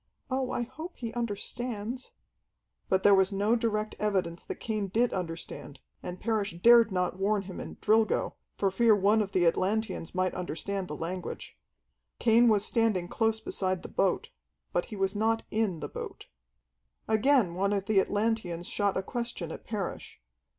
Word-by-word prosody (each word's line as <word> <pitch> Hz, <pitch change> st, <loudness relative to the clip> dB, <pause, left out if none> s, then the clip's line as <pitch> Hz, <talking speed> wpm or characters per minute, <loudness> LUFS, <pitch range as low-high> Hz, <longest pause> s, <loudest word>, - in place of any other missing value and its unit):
"Oh, 260 Hz, -1 st, 0 dB
I 240 Hz, -, -1 dB
hope 315 Hz, +9 st, -8 dB
he 230 Hz, -2 st, -5 dB
understands!" 235 Hz, +1 st, -4 dB, 0.8 s
But 190 Hz, 0 st, +2 dB
there 205 Hz, -, +7 dB
was 190 Hz, 0 st, +4 dB
no 205 Hz, +4 st, +2 dB
direct 215 Hz, -2 st, -1 dB
evidence 185 Hz, -5 st, -1 dB
that -, -, -5 dB
Cain 215 Hz, -3 st, -2 dB
did 230 Hz, +6 st, +1 dB
understand, 165 Hz, -4 st, -5 dB, 0.2 s
and 180 Hz, 0 st, -6 dB
Parrish 215 Hz, -3 st, -1 dB
dared 230 Hz, +1 st, +7 dB
not 180 Hz, 0 st, -1 dB
warn 200 Hz, +1 st, +1 dB
him 185 Hz, -1 st, -8 dB
in -, -, -7 dB
"Drilgo," 220 Hz, 0 st, +2 dB, 0.2 s
for 195 Hz, -1 st, +1 dB
fear 225 Hz, +2 st, +5 dB
one 205 Hz, +2 st, +3 dB
of 200 Hz, -2 st, -3 dB
the 180 Hz, -2 st, +2 dB
Atlanteans 190 Hz, 0 st, 0 dB
might 185 Hz, -1 st, +1 dB
understand 185 Hz, +2 st, -3 dB
the 150 Hz, -, -5 dB
language. 175 Hz, +4 st, -5 dB, 0.6 s
Cain 235 Hz, +1 st, +5 dB
was 210 Hz, -1 st, +3 dB
standing 215 Hz, -7 st, +1 dB
close 225 Hz, -1 st, +1 dB
beside 185 Hz, -4 st, -2 dB
the -, -, -7 dB
boat. -, -, 0 dB, 0.4 s
But -, -, +1 dB
he -, -, -8 dB
was 195 Hz, 0 st, 0 dB
not 225 Hz, +2 st, +1 dB
in 210 Hz, -7 st, 0 dB
the -, -, -3 dB
boat. -, -, -7 dB, 0.8 s
Again 220 Hz, -3 st, +3 dB
one 195 Hz, +3 st, 0 dB
of 200 Hz, -1 st, 0 dB
the 210 Hz, -2 st, +4 dB
Atlanteans 205 Hz, -4 st, 0 dB
shot 205 Hz, -2 st, 0 dB
a 190 Hz, -, -1 dB
question 235 Hz, -7 st, -4 dB
at -, -, -8 dB
Parrish. 205 Hz, -5 st, -5 dB
205 Hz, 165 wpm, -29 LUFS, 185-225 Hz, 0.8 s, there